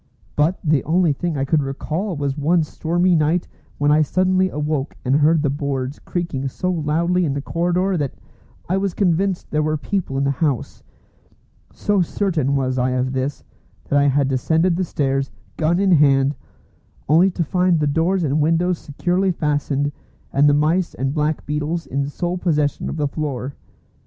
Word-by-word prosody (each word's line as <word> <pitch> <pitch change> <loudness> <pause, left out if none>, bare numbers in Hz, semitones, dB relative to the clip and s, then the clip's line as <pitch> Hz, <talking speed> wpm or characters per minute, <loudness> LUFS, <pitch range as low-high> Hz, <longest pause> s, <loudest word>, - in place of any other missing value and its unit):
But 155 +5 +2
the 150 -5 +2
only 170 0 +2
thing 165 +2 -3
I 135 - 0
could 150 +2 +2
recall 155 +7 -3
was 140 -1 -1
one 160 +3 +2
stormy 175 +4 0
night 165 +2 +1 0.3
when 145 0 +2
I 155 +1 +5
suddenly 185 +4 +2
awoke 150 -2 -2
and 130 +3 +3
heard 155 +1 +3
the 145 - +1
boards 140 -1 -3
creaking 170 -7 -3
so 180 +7 -2
loudly 170 +2 +1
in 145 -4 0
the - - -1
corridor 180 +4 0
that 145 -4 -2 0.5
I 185 - +1
was 195 -2 -1
convinced 185 0 0
there 150 - +1
were 155 0 0
people 165 -3 -3
in 135 - +1
the 140 - +2
house. 140 -3 -2 0.9
So 205 -2 0
certain 165 -6 0
was 130 -1 0
I 125 +1 +1
of 130 +1 -1
this, 130 +2 -3 0.5
that 145 - +3
I 140 - +3
had 140 0 +2
descended 160 +7 +1
the 185 - 0
stairs, 135 -3 -1 0.3
gun 165 +3 +1
in 195 -1 +3
hand, 140 -3 +4 0.7
only 165 +6 +5
to 180 -2 -2
find 180 +1 +2
the 150 - +1
doors 165 +5 +1
and 150 0 +1
windows 165 +3 +1
securely 180 +6 0
fastened, 145 -3 -1 0.4
and 145 +1 +5
the 145 - +4
mice 165 +4 +1
and 135 +1 -2
black 150 0 -1
beetles 150 +3 -2
in 140 +1 -2
sole 175 +5 -3
possession 150 -5 0
of - - -4
the 150 -1 0
floor. 140 -3 -4
155 Hz, 175 wpm, -21 LUFS, 140-175 Hz, 0.9 s, I